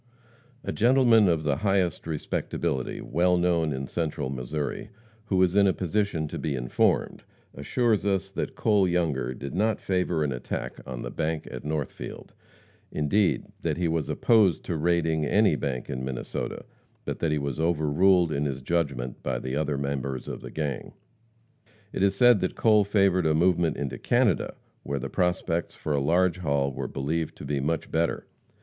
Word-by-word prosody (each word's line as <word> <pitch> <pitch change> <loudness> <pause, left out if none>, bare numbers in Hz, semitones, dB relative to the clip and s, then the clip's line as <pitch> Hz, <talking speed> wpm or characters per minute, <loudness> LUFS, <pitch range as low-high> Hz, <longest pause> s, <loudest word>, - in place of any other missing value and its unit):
A - - -3
gentleman 115 -3 +5
of 80 -2 +1
the 75 -2 +1
highest 95 -2 0
respectability, 70 -4 -2
well 90 +6 +2
known 85 -3 +2
in 65 0 -3
Central 75 -2 -3
Missouri, 75 - -4 0.4
who 95 -3 +1
is 90 0 +1
in 100 -1 +5
a 95 - +3
position 95 -3 -1
to - - -5
be 75 -3 -2
informed, 60 -1 0 0.3
assures 110 - 0
us 95 -1 0
that - - -4
Cole 105 -4 +3
Younger 75 -8 0
did 70 +2 -7
not 105 +4 +1
favor 90 -4 0
an 75 - -1
attack 60 -1 -5
on 65 -2 -5
the - - -5
bank 80 0 -2
at - - -7
Northfield; 75 -3 -5 0.6
indeed, 90 +7 +1 0.2
that - - -1
he 90 -1 0
was 80 -1 -1
opposed 105 -8 +3
to - - -2
raiding 80 -1 +1
any 100 +7 +3
bank 65 -2 -3
in 65 0 -4
Minnesota, 65 -1 -4 0.4
but - - -4
that 80 - 0
he 75 - +1
was 70 0 -3
overruled 85 +2 +3
in 70 0 -1
his 70 -2 -3
judgment 70 -6 -2
by 65 -2 -2
the 65 +2 -4
other 75 -1 -1
members 70 -2 -3
of - - -6
the - - -8
gang. 70 -5 -4 1.0
It - - -2
is 100 0 +3
said 120 -4 +6
that 95 - -2
Cole 110 -2 +4
favored 95 -4 +2
a 75 - +3
movement 85 -1 +2
into 65 -4 -4
Canada, 120 - +1 0.3
where 70 0 -3
the 70 0 -4
prospects 90 -2 -1
for 75 - -3
a 70 - +1
large 90 +5 +2
haul 70 -4 0
were - - -4
believed 80 +4 -2
to - - -9
be 70 0 -1
very 70 - -1
much 80 -1 -2
better. 85 +1 0
80 Hz, 175 wpm, -26 LUFS, 70-95 Hz, 1.0 s, said